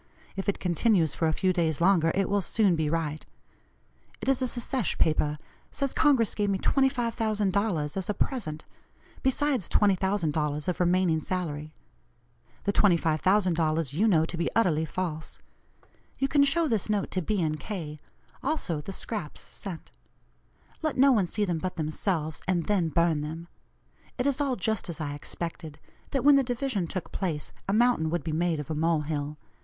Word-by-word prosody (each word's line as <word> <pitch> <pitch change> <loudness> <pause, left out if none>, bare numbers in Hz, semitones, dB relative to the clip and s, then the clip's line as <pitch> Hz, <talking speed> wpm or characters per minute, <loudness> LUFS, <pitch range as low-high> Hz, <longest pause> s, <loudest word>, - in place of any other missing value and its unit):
If 195 +1 -2
it 200 - 0
continues 175 - +2
for 165 - 0
a - - +2
few 185 +3 +1
days 165 -4 0
longer, 170 -2 +4
it 195 -1 +1
will 205 0 +1
soon 195 -1 +2
be 155 -2 0
right. 155 -1 -2 1.0
It - - -7
is 270 -1 +2
a 255 - +1
secesh 240 -2 -1
paper 150 -1 +2 0.3
says 275 -2 -2
Congress 270 -8 +3
gave 205 -1 0
me 195 - +1
$25,000 215 - 0
as 190 -1 -3
a - - +2
present, 155 - -2 0.6
besides 265 - +1
$20,000 165 -7 +1
of 180 - -1
remaining 175 -2 +2
salary. 155 -5 -3 0.9
The 200 - 0
$25,000 165 -4 +2
you 200 +9 +2
know 160 -6 +4
to 170 - -5
be 170 - 0
utterly 165 -8 +2
false. 160 -2 -4 0.8
You 270 - +1
can 280 0 +4
show 320 +4 +2
this 220 -6 0
note 205 -2 0
to 185 - -1
B. 180 -1 0
& - - -10
K., 155 -7 -6 0.4
also 260 - -1
the 195 - -7
scraps 195 -5 -5
sent. 185 -5 -8 0.9
Let 310 -3 -1
no 275 +2 +6
one 205 -8 +3
see 210 +3 0
them 175 -4 -1
but 185 +2 -3
themselves, 155 0 -2
and 175 -3 +1
then 190 -6 +1
burn 165 -1 +2
them. 160 +3 -6 0.7
It 250 - -1
is 280 -1 +1
all 275 -3 +1
just 220 -1 -2
as 165 - -5
I 145 -2 -3
expected 160 +1 -6 0.3
that 270 - -1
when 285 0 +7
the 275 - +3
division 245 -7 -1
took 185 +1 -5
place, 165 -6 -3 0.2
a - - +2
'mountain 235 -8 +3
would 175 +1 -1
be 160 - -3
made 165 0 0
of 150 +1 -5
a - - 0
mole 160 +1 +1
hill.' 150 0 -3
180 Hz, 170 wpm, -28 LUFS, 160-220 Hz, 1.0 s, when